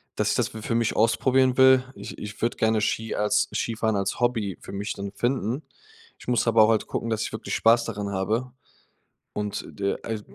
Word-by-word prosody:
dass - - 0
ich - - +1
das - - +1
für 110 +1 -4
mich 115 -1 +1
ausprobieren 130 +3 +3
will. 130 -1 +7
Ich - - -9
ich 105 0 -8
würde 115 - 0
gerne 110 -1 +2
Ski 110 +2 -1
als 105 0 +1
Skifahren 110 -1 -1
als 100 0 -2
Hobby 115 -6 0
für - - -10
mich 100 +1 -3
dann 100 0 -6
finden. 125 +4 -1 0.6
Ich - - -15
muss 120 -1 +1
aber 115 -1 +6
auch 110 - +4
halt 110 -2 +1
gucken, 115 - -3
dass 110 -1 0
ich - - -4
wirklich 110 - -4
Spaß 115 +1 +4
daran 105 -2 -4
habe. 110 +6 -1 0.8
Und, 105 -1 -3
de 100 -1 -2
äh, 110 -2 -4
110 Hz, 205 wpm, -25 LUFS, 105-120 Hz, 0.8 s, will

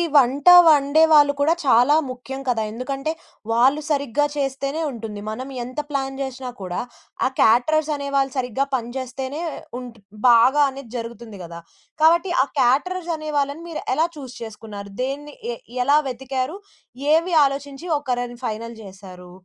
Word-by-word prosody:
వంట 275 +2 +3 0.2
వండే 300 0 +5
వాళ్ళు 290 -2 +6
కూడా 310 +3 +4
చాలా 255 +3 +5
ముఖ్యం 255 +1 -7
కదా, 225 -3 +1
ఎందుకంటే, 270 +6 -3 0.4
వాళ్ళు 260 +6 +3
సరిగ్గా 285 -1 +1
చేస్తేనే 275 +3 -2
ఉంటుంది. 220 -4 -7
మనం 255 +5 -6
ఎంత 255 +4 -6
ప్లాన్ 270 -2 -3
జేసినా 265 -1 -5
కూడా 180 -1 -4 0.5
ఆ - - +4
క్యాటరర్స్ 305 +7 +3
అనే 280 -1 -5
వాళ్ళు 270 -1 +2
సరిగ్గా 255 +2 -1
పని 235 -2 -3
జేస్తేనే 265 +3 -5 0.4
ఉంట్ 245 -3 -10 0.3
బాగా 255 +5 +6
అనేది 270 -3 -10
జరుగుతుంది 230 -3 -8
గదా! 170 0 -9 0.4
కాబట్టి, 340 +3 +4
ఆ - - -2 0.2
క్యాటరర్స్ 340 +8 +1
అనే 310 0 -6
వాళ్ళని 285 +3 -1
మీరు 325 - -5
ఎలా 320 +4 +2
చూస్ 260 -4 -9
చేసుకున్నారు? 210 -2 -8
దేన్ని 285 +2 -5 0.2
ఎ - - -6 0.3
ఎలా 285 +3 +5
వెతికారు? 260 +5 -3 0.6
ఏవి 335 +2 +2
ఆలోచించి 280 +4 -4
ఒకరని 245 -3 -3
ఫైనల్ 230 +1 -4
జేసారు? 185 -2 -12
265 Hz, 145 wpm, -22 LUFS, 235-290 Hz, 0.6 s, వాళ్ళు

